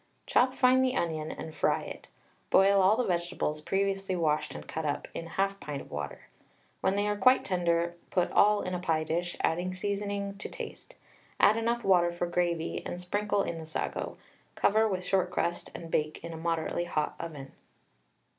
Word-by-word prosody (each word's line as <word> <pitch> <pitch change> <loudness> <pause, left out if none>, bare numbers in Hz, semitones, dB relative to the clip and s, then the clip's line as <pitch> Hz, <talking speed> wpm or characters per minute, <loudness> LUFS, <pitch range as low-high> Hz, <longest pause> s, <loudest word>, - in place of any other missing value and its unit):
Chop 255 +1 +3
fine 255 0 +5
the 260 0 +2
onion 155 -2 -1
and 160 0 -7
fry - - +1
it. - - -9 0.4
Boil 195 +1 +5
all 195 +4 +5
the 250 - +2
vegetables, 175 -4 -1
previously 195 +2 0
washed 155 -3 0
and - - -8
cut 160 - -4
up, 145 -1 -2
in 165 - -5
1/2 195 +3 -1
pint 145 -2 -5
of - - -12
water. 75 0 -5 0.6
When 190 +1 +1
they 205 +1 +1
are 210 - +1
quite 255 +5 +5
tender, 170 -2 +1
put 180 -2 +1
all 210 0 +4
in 185 - -3
a 180 - -1
pie 165 -3 +1
dish, 175 +2 -2
adding 175 +3 0
seasoning 200 +1 -3
to - - -5
taste. - - -8 0.4
Add 215 - +6
enough 235 +1 0
water 175 -3 +4
for 175 0 -2
gravy, 170 -1 -1
and 175 - -5
sprinkle 205 +3 0
in 165 - -4
the 160 - -7
sago. 160 - -3 0.4
Cover 220 +2 +3
with 185 -3 -2
short 185 -1 +2
crust, 175 -1 -2
and 165 -1 -8
bake 155 +1 -1
in 170 0 -6
a - - -6
moderately 165 +1 -1
hot 155 -3 -1
oven. 145 -5 -7
180 Hz, 185 wpm, -30 LUFS, 165-200 Hz, 0.6 s, Add